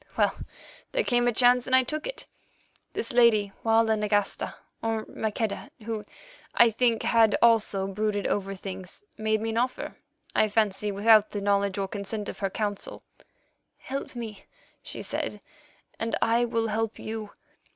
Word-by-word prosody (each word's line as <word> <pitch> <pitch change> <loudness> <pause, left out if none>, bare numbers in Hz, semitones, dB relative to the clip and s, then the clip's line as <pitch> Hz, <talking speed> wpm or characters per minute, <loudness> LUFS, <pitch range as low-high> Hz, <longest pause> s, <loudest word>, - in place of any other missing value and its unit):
Well, - - +3 0.6
there - - +2
came 245 - +2
a - - +4
chance, 245 +1 +4
and 260 - +4
I 260 - +6
took 305 +4 -2
it. - - -6 0.7
This - - -3
lady, 225 -4 +4
Walda 225 0 +4
Nagasta, 210 -1 0 0.3
or 225 -1 -1
Maqueda, 220 -1 -3
who, 220 -1 -4 0.5
I 235 -1 +6
think, 230 0 +1
had 225 -2 +4
also 220 -4 +3
brooded 205 +1 -1
over 195 -1 -1
things, 190 - -8
made 220 0 0
me 225 0 -1
an 225 - 0
offer—I 250 -3 -2
fancy 210 -1 +1
without 215 +1 +5
the 205 - -4
knowledge 200 -1 +1
or 195 -1 -1
consent 205 +1 -4
of - - -8
her 195 - 0
Council. 205 0 -4 0.7
'Help 270 -1 -6
me,' 220 -4 -7 0.4
she - - -7
said, - - -3 0.6
'and 225 0 -1
I 235 +1 +3
will 230 -1 -1
help 225 +1 -1
you. 220 -1 -5
220 Hz, 150 wpm, -27 LUFS, 205-230 Hz, 0.7 s, I